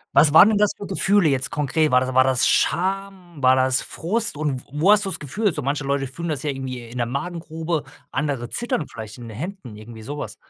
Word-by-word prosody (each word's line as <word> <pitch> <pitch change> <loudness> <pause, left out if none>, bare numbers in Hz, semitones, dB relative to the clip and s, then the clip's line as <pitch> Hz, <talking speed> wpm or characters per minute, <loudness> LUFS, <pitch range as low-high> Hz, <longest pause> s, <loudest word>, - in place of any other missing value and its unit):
Was 150 -1 +6
waren 180 +6 +9
denn 215 - +2
das 205 -1 +3
für 205 - -7
Gefühle 195 -2 +3
jetzt 135 -1 0
konkret? 150 +2 +1
War 125 -2 +4
das 130 0 -2
war 130 +1 +5
das 130 -2 +2
Scham, 185 -3 -1
war 130 -1 +5
das 130 0 +3
Frust 205 +3 -1
und 145 -3 -2
w - - -13
wo 160 +7 +3
hast 210 -1 +4
du 195 - -2
das - - -5
Gefühl? 185 - -1
So 150 - -3
manche 140 +1 -2
Leute 140 0 0
fühlen 170 +6 -6
das 155 -2 -3
ja 150 - -1
irgendwie 130 -2 -4
in 125 - -9
der 120 - 0
Magengrube, 160 +2 -4 0.3
andere 135 -4 -2
zittern 235 -10 -2
vielleicht 110 -2 -8
in 120 -1 -9
den 110 - -9
Händen 160 - -7
irgendwie 110 +1 -11
sowas. 145 +6 -6
145 Hz, 235 wpm, -22 LUFS, 130-175 Hz, 0.3 s, waren